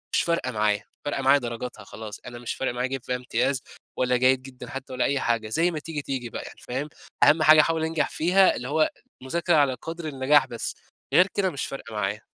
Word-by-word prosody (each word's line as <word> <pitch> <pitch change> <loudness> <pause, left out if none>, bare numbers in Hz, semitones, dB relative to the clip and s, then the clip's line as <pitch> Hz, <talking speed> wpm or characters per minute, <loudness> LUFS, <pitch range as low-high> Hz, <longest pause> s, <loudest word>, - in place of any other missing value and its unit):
مش - - +3
فارقة 170 -7 0
معايا، 105 -2 +1 0.2
فارقة 145 -2 -1
معايا 135 +2 +5
درجاتها 120 -2 -6
خلاص، 110 +2 -9
أنا 120 0 -8
مش 120 - -4
فارق 130 -2 -2
معايا 125 +1 -1
أجيب 135 -2 -4
فيها 125 - -2
إمتياز 125 +1 0 0.4
ولا 125 0 +2
جيد 130 +1 +3
جدًا 130 -2 -10
حتى 135 -1 -7
ولا 125 - +1
أي 140 -1 +1
حاجة، 115 -3 0
زي 165 +8 +2
ما 155 - -3
تيجي 155 -1 -5
تيجي 130 -4 -4
بقى - - -6
يعني، - - -11
فاهم؟ 135 +5 -3 0.3
أهم 155 +1 +6
حاجة 155 0 +8
أحاول 160 0 0
انجح 160 -1 0
فيها، 185 +4 +4
اللي 125 - -5
هو 155 +3 +2 0.3
مذاكرة 170 +5 +1
على 140 -3 +4
قدر 165 +4 -6
النجاح 140 +1 +3
بس، 120 - -4 0.4
غير 180 - +6
كده 190 -2 +2
مش 140 - -4
فارقة 115 -5 -8
معايا. 105 +1 -2
130 Hz, 220 wpm, -25 LUFS, 120-155 Hz, 0.4 s, حاجة